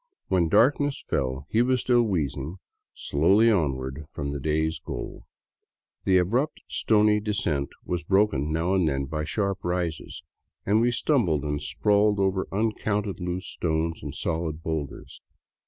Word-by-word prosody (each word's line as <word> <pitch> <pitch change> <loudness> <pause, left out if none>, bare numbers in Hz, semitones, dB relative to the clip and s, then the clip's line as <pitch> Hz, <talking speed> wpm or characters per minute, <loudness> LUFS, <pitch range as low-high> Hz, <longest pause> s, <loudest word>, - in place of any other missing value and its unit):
When 85 -3 +2
darkness 140 - +3
fell, 65 0 -1
he 110 - +3
was 125 0 +2
still 120 -1 +3
wheezing 80 - -2 0.4
slowly 100 +10 +3
on 80 -10 +2
ward 65 +1 -5
far 75 -1 -9
from 70 -1 -4
the 70 - -4
day's 80 +2 0
goal. - - -7 0.8
The 95 -1 +4
abrupt, 120 - 0
stony 105 -1 +3
descent 90 -10 -1 0.2
was 90 -1 -2
broken 95 -8 +2
now 80 +4 0
and 90 -5 +3
then 70 -1 -1
by 75 +2 -3
sharp 100 +3 -1
rises, 85 -4 -3 0.4
and 105 +3 +3
we 120 - +3
stumbled 115 - +1
and 75 0 -2
sprawled 105 +3 +2
orer 95 -1 0
uncounted 105 -1 -1
loose 90 +1 -3
stones 80 0 -2
and - - -6
solid 80 -1 -3
boulders. 80 -4 -5
90 Hz, 150 wpm, -26 LUFS, 75-105 Hz, 0.8 s, The